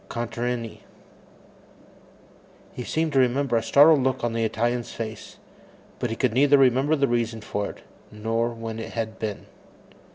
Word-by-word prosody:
Contarini. 120 Hz, 0 st, -4 dB, 1.9 s
He 125 Hz, -, -6 dB
seemed 160 Hz, +4 st, -1 dB
to 135 Hz, -, +4 dB
remember 130 Hz, 0 st, +2 dB
a 115 Hz, -, +3 dB
startled 145 Hz, +3 st, +6 dB
look 130 Hz, -1 st, -1 dB
on 120 Hz, -1 st, 0 dB
the 115 Hz, 0 st, 0 dB
Italian's 120 Hz, +2 st, -1 dB
face, 110 Hz, -2 st, -7 dB, 0.6 s
but 120 Hz, -, -2 dB
he 115 Hz, -, -3 dB
could 125 Hz, -1 st, 0 dB
neither 140 Hz, +3 st, +5 dB
remember 135 Hz, +3 st, +3 dB
the 140 Hz, -2 st, +1 dB
reason 115 Hz, -1 st, -1 dB
for 100 Hz, 0 st, -3 dB
it -, -, -12 dB, 0.3 s
nor 115 Hz, +2 st, -1 dB
when 115 Hz, -1 st, -6 dB
it 115 Hz, -, -7 dB
had 110 Hz, -1 st, -4 dB
been. 105 Hz, -2 st, -4 dB
120 Hz, 155 wpm, -24 LUFS, 115-130 Hz, 1.9 s, startled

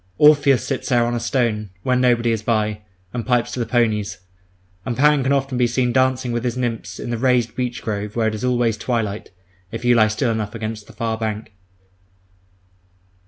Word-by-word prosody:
Orpheus 145 Hz, -5 st, +5 dB
sits 135 Hz, -, -3 dB
there 120 Hz, -2 st, +3 dB
on 120 Hz, -, -1 dB
a 120 Hz, -, -1 dB
stone, 115 Hz, -5 st, -1 dB
when 125 Hz, -1 st, +2 dB
nobody 120 Hz, -2 st, +3 dB
is 110 Hz, -2 st, -1 dB
by, 105 Hz, -1 st, 0 dB, 0.3 s
and 120 Hz, -1 st, -3 dB
pipes 120 Hz, 0 st, +1 dB
to 125 Hz, -, -4 dB
the 120 Hz, -, -1 dB
ponies; 110 Hz, -4 st, 0 dB, 0.7 s
and 120 Hz, -3 st, -3 dB
Pan 150 Hz, +1 st, +4 dB
can 130 Hz, +1 st, 0 dB
often 135 Hz, -2 st, 0 dB
be 120 Hz, -, +4 dB
seen 120 Hz, 0 st, 0 dB
dancing 130 Hz, -1 st, +1 dB
with 120 Hz, 0 st, -2 dB
his 125 Hz, 0 st, -2 dB
nymphs 120 Hz, -3 st, -3 dB
in 120 Hz, -, -5 dB
the 120 Hz, -, -2 dB
raised 125 Hz, -2 st, +2 dB
beech 125 Hz, -1 st, -3 dB
grove 105 Hz, 0 st, -4 dB
where 115 Hz, -2 st, +1 dB
it 110 Hz, -, -1 dB
is 110 Hz, -, -5 dB
always 120 Hz, -3 st, +1 dB
twilight, 110 Hz, -3 st, -2 dB, 0.4 s
if 115 Hz, +2 st, -6 dB
you 120 Hz, -, +5 dB
lie 110 Hz, -2 st, +5 dB
still 115 Hz, +3 st, 0 dB
enough 110 Hz, 0 st, -3 dB
against 110 Hz, -1 st, -5 dB
the -, -, -14 dB
far 115 Hz, -1 st, -2 dB
bank. 110 Hz, -1 st, -4 dB
120 Hz, 200 wpm, -21 LUFS, 110-125 Hz, 0.7 s, Orpheus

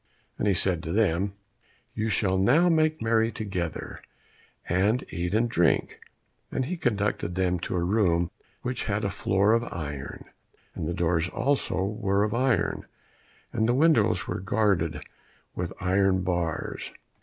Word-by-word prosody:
And -, -, 0 dB
he 100 Hz, -, +3 dB
said 90 Hz, -1 st, +1 dB
to 80 Hz, -, -5 dB
them, 100 Hz, -1 st, +1 dB, 0.6 s
"You 110 Hz, +1 st, -1 dB
shall 95 Hz, -3 st, +1 dB
now 145 Hz, -, +4 dB
make 155 Hz, -4 st, +2 dB
merry 115 Hz, 0 st, +2 dB
together, 95 Hz, -8 st, -4 dB, 0.7 s
and 100 Hz, +8 st, +2 dB
eat 85 Hz, +4 st, -2 dB
and 115 Hz, +2 st, +3 dB
drink," 90 Hz, -7 st, +1 dB, 0.5 s
and 130 Hz, -, -1 dB
he 180 Hz, +7 st, -3 dB
conducted 105 Hz, -, -1 dB
them 90 Hz, -1 st, +1 dB
to 90 Hz, -, -4 dB
a 85 Hz, -, 0 dB
room 85 Hz, -3 st, +2 dB, 0.3 s
which 125 Hz, 0 st, -2 dB
had 105 Hz, -1 st, -1 dB
a 100 Hz, -, -1 dB
floor 100 Hz, +3 st, +2 dB
of 115 Hz, 0 st, +2 dB
iron, 75 Hz, -4 st, -6 dB, 0.5 s
and 75 Hz, -, -4 dB
the 85 Hz, -, -2 dB
doors 85 Hz, 0 st, +1 dB
also 130 Hz, -9 st, 0 dB
were 100 Hz, -1 st, 0 dB
of 105 Hz, -, -1 dB
iron, 120 Hz, -6 st, 0 dB, 0.7 s
and 110 Hz, +1 st, +1 dB
the 120 Hz, -, +3 dB
windows 140 Hz, -7 st, +3 dB
were -, -, -3 dB
guarded 95 Hz, -6 st, 0 dB, 0.5 s
with -, -, -3 dB
iron 95 Hz, 0 st, +2 dB
bars. 85 Hz, -3 st, -2 dB
100 Hz, 150 wpm, -27 LUFS, 90-115 Hz, 0.7 s, now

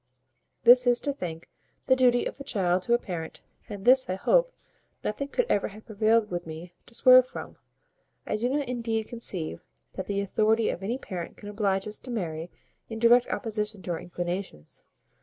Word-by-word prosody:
This 245 Hz, +1 st, +7 dB
is, 245 Hz, +4 st, +2 dB
I -, -, +3 dB
think, 170 Hz, -, -6 dB, 0.4 s
the 260 Hz, -, +4 dB
duty 245 Hz, -2 st, +3 dB
of -, -, -5 dB
a -, -, -6 dB
child 185 Hz, -6 st, 0 dB
to 235 Hz, +6 st, +2 dB
a -, -, +3 dB
parent; 170 Hz, -8 st, -7 dB, 0.3 s
and 200 Hz, -2 st, -7 dB
this, 260 Hz, -1 st, +5 dB
I 185 Hz, -, 0 dB
hope, -, -, +2 dB, 0.5 s
nothing 275 Hz, +7 st, -3 dB
could -, -, 0 dB
ever 200 Hz, -, +1 dB
have 215 Hz, +2 st, -13 dB
prevailed 220 Hz, 0 st, +2 dB
with 175 Hz, -1 st, -4 dB
me 165 Hz, +2 st, -8 dB
to 235 Hz, -, -9 dB
swerve 255 Hz, 0 st, +7 dB
from. -, -, -9 dB, 0.7 s
I -, -, -1 dB
do 235 Hz, +4 st, -1 dB
not 280 Hz, 0 st, -1 dB
indeed 230 Hz, -3 st, -2 dB
conceive 180 Hz, -, -3 dB, 0.3 s
that -, -, -6 dB
the 200 Hz, -1 st, -1 dB
authority 215 Hz, +3 st, +2 dB
of -, -, -7 dB
any 225 Hz, +6 st, -2 dB
parent 180 Hz, -10 st, -7 dB
can 205 Hz, -, -9 dB
oblige 200 Hz, -2 st, 0 dB
us 210 Hz, -, -5 dB
to 255 Hz, -, -12 dB
marry 170 Hz, -7 st, -4 dB, 0.4 s
in 225 Hz, -, -5 dB
direct 240 Hz, +2 st, +5 dB
opposition 215 Hz, -4 st, -3 dB
to 175 Hz, -, -4 dB
our 165 Hz, -, -2 dB
inclinations. 175 Hz, -, -6 dB
215 Hz, 190 wpm, -27 LUFS, 185-245 Hz, 0.7 s, This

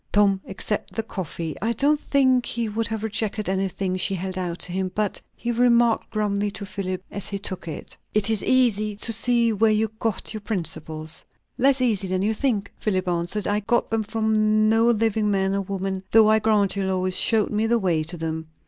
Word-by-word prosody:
Tom 200 Hz, -2 st, +3 dB
accepted 205 Hz, +2 st, -3 dB
the 225 Hz, -, -1 dB
coffee; 170 Hz, -6 st, -5 dB
I 225 Hz, +3 st, 0 dB
don't 290 Hz, +5 st, +2 dB
think 260 Hz, -4 st, +2 dB
he 235 Hz, -1 st, 0 dB
could 220 Hz, +1 st, -1 dB
have 220 Hz, -1 st, -4 dB
rejected 215 Hz, -1 st, -2 dB
anything 190 Hz, 0 st, -1 dB
she 195 Hz, +1 st, 0 dB
held 185 Hz, +1 st, -4 dB
out 175 Hz, -2 st, -3 dB
to 180 Hz, -, -2 dB
him; 185 Hz, 0 st, -2 dB
but 210 Hz, -2 st, -1 dB
he 240 Hz, -, -3 dB
remarked 235 Hz, -1 st, +3 dB
grumly 205 Hz, -1 st, -1 dB
to 200 Hz, 0 st, -6 dB
Philip, 185 Hz, -1 st, -4 dB
as 200 Hz, -, -5 dB
he 200 Hz, -, -3 dB
took 190 Hz, -3 st, -6 dB
it, 155 Hz, -, -7 dB, 0.2 s
"It 210 Hz, -2 st, +1 dB
is 220 Hz, -2 st, +3 dB
easy 215 Hz, -5 st, +2 dB
to 230 Hz, +3 st, +2 dB
see 235 Hz, 0 st, +2 dB
where 220 Hz, +2 st, +3 dB
you 215 Hz, 0 st, +1 dB
got 225 Hz, -1 st, -1 dB
your 215 Hz, -, -5 dB
principles!" 160 Hz, -6 st, -2 dB, 0.4 s
"Less 270 Hz, +1 st, +3 dB
easy 215 Hz, -6 st, +1 dB
than 185 Hz, +1 st, -1 dB
you 215 Hz, +2 st, +1 dB
think," 215 Hz, -5 st, -1 dB
Philip 185 Hz, -3 st, -1 dB
answered. 175 Hz, +4 st, -1 dB
"I 205 Hz, +1 st, +1 dB
got 235 Hz, +3 st, 0 dB
them 225 Hz, 0 st, +1 dB
from 215 Hz, 0 st, +1 dB
no 225 Hz, +1 st, +4 dB
living 220 Hz, -2 st, +2 dB
man 195 Hz, -1 st, +1 dB
or 200 Hz, -, 0 dB
woman, 195 Hz, 0 st, -3 dB
though 215 Hz, -1 st, +6 dB
I 220 Hz, -, +4 dB
grant 210 Hz, -3 st, +2 dB
you, 200 Hz, -, -1 dB
Lois 185 Hz, -1 st, 0 dB
showed 220 Hz, -3 st, +2 dB
me 215 Hz, +1 st, +1 dB
the 235 Hz, +1 st, +3 dB
way 180 Hz, -7 st, +1 dB
to 165 Hz, +3 st, -5 dB
them. 160 Hz, 0 st, -4 dB
210 Hz, 205 wpm, -24 LUFS, 190-225 Hz, 0.4 s, though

